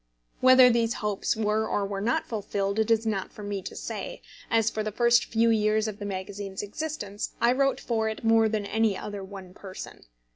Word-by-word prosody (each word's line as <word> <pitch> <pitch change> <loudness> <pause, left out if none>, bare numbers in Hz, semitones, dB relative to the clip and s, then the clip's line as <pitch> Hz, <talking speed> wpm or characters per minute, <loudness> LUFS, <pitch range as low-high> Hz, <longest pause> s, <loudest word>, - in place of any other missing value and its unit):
Whether 255 -1 +7
these 230 -1 +1
hopes 210 -2 -1
were 215 0 0
or 205 - 0
were 195 0 -4
not 230 +4 0
fulfilled 200 -2 -2
it 220 - +1
is 225 0 +3
not 205 -4 -2
for 210 - -10
me 205 -1 -3
to - - -8
say, - - -6 0.3
as, 225 -1 +2
for 215 - -2
the 215 0 -3
first 235 +2 +4
few 230 0 +2
years 215 0 +2
of 210 -1 -6
the 205 - -5
magazine's 195 0 -5
existence, 210 -3 -5
I 235 - +4
wrote 275 +1 +2
for 220 -2 -1
it 220 - -6
more 225 -1 +4
than 215 -2 -2
any 215 -1 +1
other 205 -1 -6
one 190 -2 -10
person. 190 - -10
215 Hz, 205 wpm, -27 LUFS, 200-225 Hz, 0.3 s, Whether